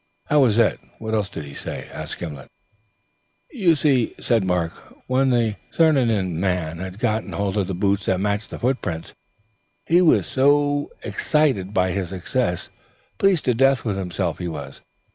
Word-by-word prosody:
"How 150 - +5
was 120 -6 +4
that? 115 - +3 0.2
What 110 0 -5
else 105 -2 0
did 80 -6 -7
he 70 - -10
say?" - - -6 1.6
"You 190 - +3
see," 135 -6 +1
said 115 -4 +2
Mark, 90 -3 0 0.3
"when 130 +1 +2
the 115 -4 +1
Crianan 115 - +2
man 90 -3 -1
had 95 +1 -6
got 110 -1 0
hold 95 +1 -2
of 100 -3 0
the 95 - -3
boots 100 +1 0
that 95 - +2
matched 100 +1 -1
the - - -6
footprints, 115 -10 -2 0.7
he 175 +2 +4
was 170 - +3
no 145 +1 +3
end - - -5
excited 135 -12 +1
by 95 -2 +1
his 95 -2 -2
success. 90 -2 -2 0.5
Pleased 195 -5 +3
to 125 - +3
death 135 +2 +3
with 105 -4 -1
himself, 90 -2 -2
he 90 - -3
was. 70 -4 -7
105 Hz, 160 wpm, -22 LUFS, 95-135 Hz, 1.6 s, How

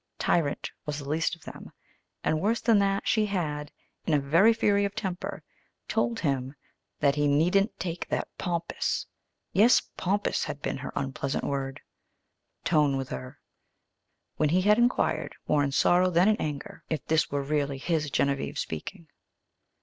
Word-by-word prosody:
"Tyrant" 150 -5 0 0.2
was 150 -1 -2
the 140 -2 -7
least 160 +3 0
of 170 - -21
them, - - -10 0.5
and, 155 0 +1
worse 220 +3 +1
than 225 -3 +4
that, 195 0 +1
she 215 -1 +3
had, 150 -7 -2 0.4
in 155 - +3
a - - +4
very 165 +11 +5
fury 205 -3 +2
of 200 0 -2
temper, 190 -5 -4 0.4
told 225 +1 0
him 135 -3 -1 0.4
that 140 -1 +3
he 145 0 +1
"needn't 190 +8 +2
take 170 -1 -4
that - - -1
pompous" 170 -2 -2 0.5
yes, 225 +5 +6 0.2
"pompous" 200 +3 0
had 150 -2 -5
been - - -2
her 135 - -6
unpleasant 135 0 -2
word 135 -1 -3 0.8
"tone" 150 -4 +3
with 135 -1 -4
her, 65 -1 -7 1.0
when 155 - +2
he 180 +4 +3
had 210 +3 +5
inquired, 240 +1 +1
more 150 -1 +3
in 140 - 0
sorrow 180 +6 +4
than 175 +2 +4
in 215 - +5
anger, 145 -2 -5
if 155 -4 -2
this 160 0 +2
were 140 0 -1
really 140 -1 -1
his 155 +1 -1
Genevieve 140 0 0
speaking. 165 - -5
160 Hz, 160 wpm, -28 LUFS, 140-195 Hz, 1.0 s, yes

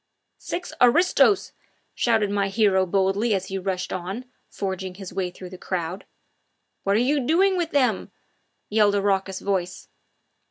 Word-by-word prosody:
"Six 360 -3 -5
aristos!" 355 - +4 0.4
shouted 220 -4 +1
my 200 -1 +1
hero 195 -2 +2
boldly 195 +4 +1
as 190 0 -4
he 195 0 -3
rushed 185 -1 -3
on, 190 +7 -5 0.2
forging 190 -1 -4
his 190 -1 -9
way 185 -2 -1
through 180 0 -11
the 185 - -10
crowd. 180 0 -4 0.8
"What 200 0 +1
are - - +4
you 280 +5 +2
doing 355 +9 +3
with 345 -3 -1
them?" 250 - +1 0.6
yelled 210 -1 +3
a 200 - +1
raucous 195 -1 0
voice. 185 -2 -3
200 Hz, 150 wpm, -24 LUFS, 190-240 Hz, 0.8 s, aristos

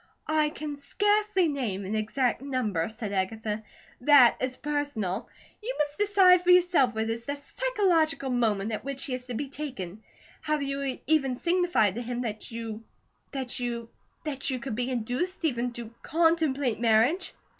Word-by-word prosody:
"I 310 -1 +2
can 300 -1 -6
scarcely 415 +4 +2
name 235 -10 -2
an 195 - -3
exact 230 +5 0
number," 240 -12 -1
said 220 -2 -5
Agatha. 210 +3 -2 0.4
"That 255 -2 +7
is 255 0 -2
personal. 285 -10 -2 0.3
You - - -4
must 295 +2 -1
decide 385 -3 +6
for 360 - 0
yourself 350 -9 +5
what 220 0 -1
is 230 +1 -4
the 285 - -1
psychological 330 - +1
moment 220 -4 +1
at 215 - -3
which 275 +3 -4
he 270 - -4
is 255 0 -5
to 245 - -4
be 280 +5 -3
taken. 220 - -6 0.4
Have 300 -1 0
you 275 -1 -2
even 275 -4 +2
signified 345 - +2
to 235 - -4
him 245 0 -3
that 220 -3 -4
you 225 -1 -6 0.5
that 260 -3 -4
you 235 -2 -3 0.3
that 275 -2 -2
you 260 - -1
could 250 0 -5
be 245 +3 -1
induced, 255 - -2
even 245 -4 0
to 235 -1 -7
CONTEMPLATE 315 -7 +2
marriage?" 235 - +3
260 Hz, 165 wpm, -28 LUFS, 230-310 Hz, 0.5 s, That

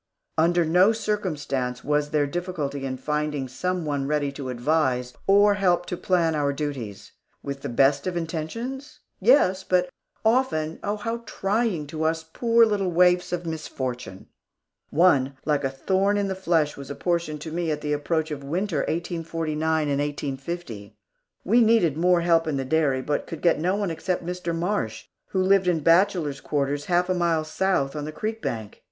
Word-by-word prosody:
Under 170 +1 +3
no 180 +6 +5
circumstance 150 - -2
was 150 0 +1
there 150 -1 +2
difficulty 145 -4 -3
in 130 0 -4
finding 150 0 -2
some 180 +7 -2
one 140 -2 -1
ready 145 -1 0
to 135 -1 -6
advise 125 -1 0
or 205 +1 +6
help 180 -3 +2
to 180 - -3
plan 170 -2 +1
our 145 -2 +1
duties. 135 -9 -5 0.3
With 140 0 -5
the - - -4
best 140 +5 +3
of 180 -1 -2
intentions? 230 - -5 0.2
Yes, 190 -4 +4
but 180 -1 +1 0.4
often, 220 -10 +1
oh, 205 +1 -1
how 230 +2 -3
trying 200 -5 -1
to 155 +2 -6
us, 160 0 0
poor 230 +8 +3
little 205 -4 0
waifs 180 +1 +3
of 175 -1 -3
misfortune! 130 - -5 0.6
One, 140 -5 +3
like 150 -2 +1
a 135 - +1
thorn 190 +9 +1
in 200 -1 0
the - - 0
flesh, 165 -5 +1
was 140 -1 -9
apportioned 165 0 -2
to 160 0 -6
me 170 0 -2
at 150 -1 -2
the 150 0 -1
approach 155 +2 -1
of 150 - -3
the 140 - -11
Winter 175 +2 -1
of - - -3
1849 160 -2 -1
and 140 -1 0
1850. 140 -5 -5 0.5
We 235 +5 +4
needed 220 -10 +4
more 175 +2 +3
help 165 -1 +3
in 150 -3 -1
the 135 - -2
dairy, 135 -2 +1
but 145 +1 -2
could 165 - -7
get 170 -3 +4
no 180 +4 +1
one 200 -4 -1
except 175 +2 -2
Mr. 175 -1 -3
Marsh, 165 - -2 0.2
who 190 -1 0
lived 190 -1 +4
in 170 -3 +2
bachelor 170 -2 +3
quarters 145 0 -2
half 180 0 +2
a 185 - +1
mile 170 -3 +1
south 155 -4 0
on 150 -1 -3
the 155 - -5
creek 220 +7 -4
bank. 110 -3 -5
160 Hz, 180 wpm, -25 LUFS, 145-185 Hz, 0.6 s, or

